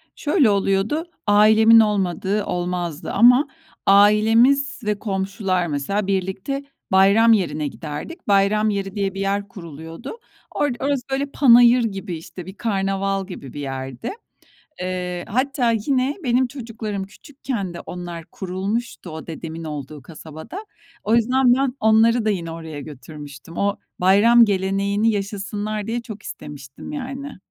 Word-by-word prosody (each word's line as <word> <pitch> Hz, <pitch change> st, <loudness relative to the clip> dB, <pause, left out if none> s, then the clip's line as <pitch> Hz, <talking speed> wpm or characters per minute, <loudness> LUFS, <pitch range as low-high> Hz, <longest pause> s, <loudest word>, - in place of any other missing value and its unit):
Şöyle 295 Hz, -, +2 dB
oluyordu: 200 Hz, -, +1 dB, 0.2 s
Ailemin 220 Hz, +2 st, +6 dB
olmadığı 200 Hz, -1 st, +1 dB
olmazdı 175 Hz, -2 st, -3 dB
ama 250 Hz, +7 st, +6 dB, 0.4 s
ailemiz 225 Hz, +8 st, +4 dB
ve 210 Hz, -1 st, -1 dB
komşular, 190 Hz, -3 st, -1 dB
mesela, 185 Hz, +8 st, -2 dB
birlikte 195 Hz, +8 st, -2 dB, 0.3 s
bayram 200 Hz, +4 st, +6 dB
yerine 155 Hz, -7 st, 0 dB
giderdik. 155 Hz, -, -8 dB
Bayram 205 Hz, +2 st, +3 dB
yeri 195 Hz, 0 st, -3 dB
diye 195 Hz, -2 st, -1 dB
bir 195 Hz, -, -6 dB
yer 200 Hz, +1 st, -1 dB
kuruluyordu. 165 Hz, -, -9 dB, 0.3 s
Orada 270 Hz, -2 st, -1 dB
orası 280 Hz, -3 st, +1 dB
böyle, 275 Hz, +1 st, 0 dB
panayır 245 Hz, -3 st, +6 dB
gibi, 195 Hz, -5 st, -4 dB
işte, 170 Hz, +2 st, -10 dB
bir 190 Hz, -, -9 dB
karnaval 195 Hz, -2 st, -1 dB
gibi 140 Hz, -9 st, -9 dB
bir 145 Hz, -, -7 dB
yerdi. 135 Hz, -, -5 dB, 0.7 s
Eee, 180 Hz, -1 st, -3 dB
hatta 255 Hz, +1 st, +1 dB
yine 255 Hz, +5 st, 0 dB
benim 250 Hz, 0 st, +2 dB
çocuklarım 225 Hz, -6 st, -5 dB
küçükken 235 Hz, -, -6 dB
de -, -, -7 dB
onlar 175 Hz, -2 st, -7 dB
kurulmuştu 190 Hz, +2 st, -4 dB
o 160 Hz, +1 st, -8 dB
dedemin 165 Hz, 0 st, -7 dB
olduğu 150 Hz, -1 st, -7 dB
kasabada. 160 Hz, -, -10 dB, 0.4 s
O 220 Hz, +2 st, +2 dB
yüzden 250 Hz, +2 st, +4 dB
ben 265 Hz, 0 st, 0 dB
onları 220 Hz, +1 st, +4 dB
da -, -, +2 dB
yine 170 Hz, -5 st, -2 dB
oraya 160 Hz, -2 st, -7 dB
götürmüştüm. 145 Hz, +1 st, -11 dB
O 200 Hz, 0 st, 0 dB, 0.2 s
bayram 220 Hz, +6 st, +6 dB
geleneğini 200 Hz, +2 st, 0 dB
yaşasınlar 205 Hz, +1 st, -4 dB
diye 235 Hz, +1 st, -2 dB
çok 215 Hz, -3 st, -10 dB
istemiştim 140 Hz, -2 st, -9 dB
yani. 275 Hz, -2 st, -6 dB
200 Hz, 130 wpm, -21 LUFS, 180-235 Hz, 0.7 s, Ailemin